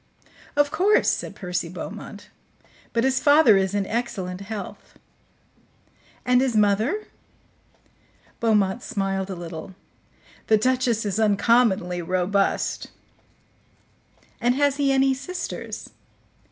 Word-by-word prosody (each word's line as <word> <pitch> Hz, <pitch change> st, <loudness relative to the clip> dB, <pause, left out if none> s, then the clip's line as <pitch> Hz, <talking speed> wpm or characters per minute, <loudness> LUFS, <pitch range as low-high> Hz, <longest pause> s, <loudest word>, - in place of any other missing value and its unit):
"Of 290 Hz, 0 st, +2 dB
course," 380 Hz, +7 st, +3 dB
said -, -, -4 dB
Percy 180 Hz, -3 st, -3 dB
Beaumont. 205 Hz, +3 st, -8 dB, 0.6 s
"But 230 Hz, -, 0 dB
his 265 Hz, 0 st, +2 dB
father 290 Hz, -7 st, +6 dB
is 190 Hz, 0 st, +1 dB
in 200 Hz, -1 st, 0 dB
excellent 195 Hz, -5 st, -3 dB
health." 200 Hz, 0 st, -8 dB, 1.3 s
"And 250 Hz, 0 st, +4 dB
his 255 Hz, -4 st, +1 dB
mother?" 215 Hz, -, +2 dB, 1.3 s
Beaumont 215 Hz, -1 st, +2 dB
smiled 195 Hz, -5 st, -2 dB
a 190 Hz, -, -4 dB
little. 170 Hz, +1 st, -8 dB, 0.7 s
"The 220 Hz, -, +5 dB
duchess 245 Hz, -1 st, +1 dB
is 205 Hz, +1 st, -1 dB
uncommonly 205 Hz, -4 st, +2 dB
robust." 185 Hz, +3 st, 0 dB, 1.5 s
"And 245 Hz, +1 st, +2 dB
has 285 Hz, 0 st, +2 dB
he 280 Hz, -1 st, +2 dB
any 270 Hz, 0 st, +3 dB
sisters?" 320 Hz, +8 st, -6 dB
215 Hz, 105 wpm, -24 LUFS, 195-260 Hz, 1.5 s, father